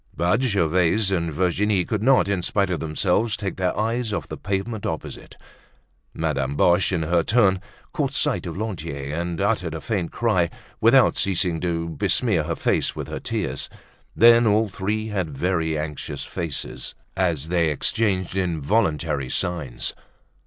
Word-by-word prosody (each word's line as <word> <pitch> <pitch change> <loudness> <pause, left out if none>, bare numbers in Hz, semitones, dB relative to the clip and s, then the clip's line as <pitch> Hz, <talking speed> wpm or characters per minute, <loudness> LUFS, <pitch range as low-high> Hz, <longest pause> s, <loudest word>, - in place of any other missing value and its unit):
But 90 +8 +2
Gervaise 95 -2 +2
and 85 -3 0
Virginie 95 +4 +1
could 105 -2 -2
not, 125 -6 +4
in 100 -2 0
spite 100 +1 0
of 85 - -1
themselves, 90 +8 0
take 95 -3 -4
their 90 0 0
eyes 115 +1 0
off 105 - -3
the - - -4
pavement 100 +2 -3
opposite. 80 - -5 0.7
Madame 70 -4 -1
Boche, 90 +6 +3
in 85 -4 0
her 85 +2 +2
turn, 95 -1 +3 0.3
caught - - -1
sight - - 0
of - - -5
Lantier 80 -9 -4
and 85 0 -3
uttered 95 -5 0
a - - -4
faint 95 -3 -2
cry 95 -8 +1 0.3
without - - +5
ceasing 90 -3 +1
to 85 -2 -1
besmear 85 - 0
her 85 - -1
face - - 0
with - - -5
her - - -4
tears. - - -3 0.5
Then 115 0 +7
all 110 +1 +3
three 105 +3 -2
had 90 -9 -3
very 80 -3 0
anxious 75 -1 -4
faces 80 -5 -5 0.2
as 85 -5 0
they 85 -2 +2
exchanged 95 +4 0
involuntary 80 - 0
signs. 80 -7 -2
90 Hz, 150 wpm, -23 LUFS, 80-105 Hz, 0.7 s, Then